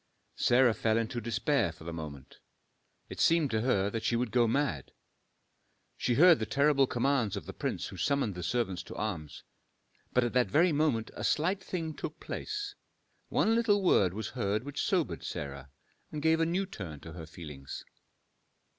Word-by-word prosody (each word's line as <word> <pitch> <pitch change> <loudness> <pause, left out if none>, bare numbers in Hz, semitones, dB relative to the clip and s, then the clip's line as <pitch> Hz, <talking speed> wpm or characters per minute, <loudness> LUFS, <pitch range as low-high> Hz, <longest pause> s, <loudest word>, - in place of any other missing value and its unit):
Sarah 120 -1 +4
fell 110 0 +1
into 115 +1 -2
despair 120 - +1
for 80 -1 -14
the 85 +1 -5
moment: 75 -5 -8 0.7
it - - -9
seemed 165 -4 +3
to 110 -1 +1
her 100 -5 +1
that 115 - -2
she 120 - +1
would 120 -1 -1
go 120 -1 +4
mad. 115 - -1 1.0
She 120 - 0
heard 170 +3 +7
the 110 - -2
terrible 140 -1 +3
commands 125 -4 +1
of - - -6
the - - -7
prince - - -3
who - - -9
summoned 140 -7 +1
the 90 - -6
servants 95 -2 -1
to - - -9
arms. 90 -8 -4 0.7
But 125 - +3
at 120 - -1
that 125 -1 +3
very 170 +4 +4
moment 145 -7 +1
a - - -6
slight 185 +5 +1
thing 165 -4 -3
took - - -6
place, 415 -1 -4 0.6
one 225 - +2
little 220 -4 +3
word 95 - +4
was 110 -1 -4
heard 105 -3 -1
which 145 +1 -4
sobered 180 -5 0
Sarah, 70 -4 -6 0.4
and 150 - -4
gave 160 +2 +3
a 165 - +2
new 185 +4 0
turn 90 - -8
to 80 - -9
her 80 -2 -8
feelings. 75 -5 -9
120 Hz, 180 wpm, -31 LUFS, 95-150 Hz, 1.0 s, heard